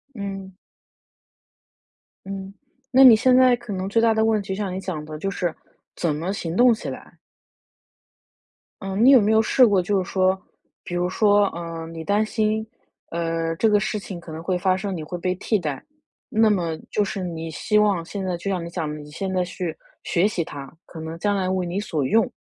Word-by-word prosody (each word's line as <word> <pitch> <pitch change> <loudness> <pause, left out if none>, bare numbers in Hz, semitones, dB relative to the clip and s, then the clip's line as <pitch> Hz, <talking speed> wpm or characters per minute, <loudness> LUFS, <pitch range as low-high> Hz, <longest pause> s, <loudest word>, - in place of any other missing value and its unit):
嗯。 195 -2 -6 1.7
嗯， 195 0 -6 0.4
那 265 +1 +7
你 250 -4 +10
现 250 +3 +4
在 255 -1 +6
可 240 -3 -7
能 190 0 -3
最 225 +3 +2
大 230 -1 +4
的 220 0 +2
问 220 -1 +2
题 195 - -13
就 190 - -1
像 195 -2 -3
你 185 - -3
讲 180 -6 -5
的， 155 0 -7
就 195 +6 -2
是 175 -3 -2 0.4
怎 160 -4 -1
么 165 +5 -3
行 170 -4 -4
动 245 +3 +6
起 220 - -5
来。 - - -10 1.7
嗯 195 0 -3
你 265 - +8
有 260 -4 +8
没 210 +1 +2
有 220 - +5
试 250 +3 +5
过 200 -3 +3
就 190 +1 0
是 - - -10
说， 190 0 +2 0.4
比 175 - -5
如 175 0 +1
说， 205 +2 +3
嗯， 165 -1 -6
你 165 -1 -6
担 205 +4 +1
心， 220 0 0 0.5
呃， 165 -1 -1
这 225 - +3
个 210 -1 +4
事 210 0 -2
情 190 -3 -8
可 170 -1 -11
能 160 +1 -6
会 180 +2 -1
发 185 +1 +2
生， 195 0 -3
你 160 - -5
会 175 +3 -6
被 180 +1 -1
替 210 +3 0
代， 150 -6 -4 0.5
那 220 0 +3
么 175 -6 0
就 210 - +1
是 195 -1 -4
你 165 -2 -5
希 210 +7 0
望 205 -5 +3
现 190 +3 -5
在 180 -1 -1
就 185 +3 -4
像 185 -3 -1
你 - - -6
讲 165 -4 -3
的， 150 - -5
你 150 0 -11
现 190 +5 -4
在 185 -1 +1
去 175 -2 -5 0.3
学 180 +4 +2
习 190 -5 -1
它， 140 -3 -9 0.2
可 165 - -10
能 160 +1 -6
将 205 +2 +1
来 185 -1 -1
为 185 0 0
你 175 +2 -3
所 160 -8 -2
用。 220 +11 +2
190 Hz, 235 characters per minute, -23 LUFS, 170-210 Hz, 1.7 s, 你